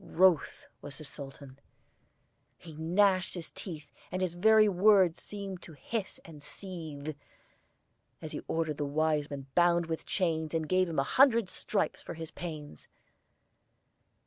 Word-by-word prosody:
Wroth 180 -3 +3 0.2
was 145 -2 -7
the - - -9
Sultan; 140 -1 -9 1.0
he 165 - -11
gnashed 185 +5 +2
his 170 -3 -6
teeth, 175 -6 -8 0.2
And 185 0 -1
his 180 -2 -1
very 215 +4 +6
words 190 -3 +4
seemed 195 -3 -6
to 165 - -10
hiss 195 - -4
and 155 -4 -11
seethe, 155 -4 -5 1.0
As - - -7
he - - -4
ordered 160 -3 -1
the 145 - -1
Wiseman 145 -2 0
bound 175 -1 +4
with 160 0 -4
chains, 160 -4 0
And 160 -1 -1
gave 185 0 +2
him 160 - -4
a 135 - +4
hundred 235 - +4
stripes 210 - -1
for - - -7
his 160 -1 -7
pains. 155 - -7
165 Hz, 145 wpm, -31 LUFS, 150-185 Hz, 1.0 s, very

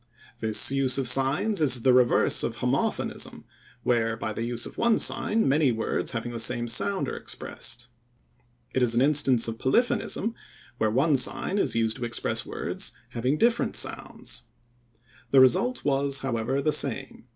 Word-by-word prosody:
This 110 +3 +2
use 135 -1 +3
of 135 -2 +1
signs 135 - +2
is 125 -5 +2
the 130 - +4
reverse 125 -1 +3
of - - -3
homophonism, - - -2 0.4
where 115 -2 0
by 110 - -4
the 115 - -5
use 120 0 -2
of - - -9
one 235 -1 +3
sign 220 +1 +1
many 140 -1 +3
words 115 -1 -2
having 120 +1 -4
the 115 - -6
same 120 +1 +1
sound 100 -4 +1
are - - -4
expressed. 120 0 -7 0.9
It 130 - 0
is 120 -2 +2
an 120 - +3
instance 135 -5 +3
of 115 0 -6
polyphonism 230 - 0 0.5
where 110 - +2
one 135 +6 +2
sign 160 +9 0
is - - 0
used 115 -1 0
to 120 - -4
express 120 - -2
words - - -5 0.2
having 125 +5 -1
different 235 +3 +1
sounds. - - -4 0.9
The 135 - +5
result 140 - +3
was, 140 -1 +1
however, 130 +2 -2
the 155 - +1
same. 135 -2 -1
130 Hz, 165 wpm, -26 LUFS, 115-140 Hz, 0.9 s, The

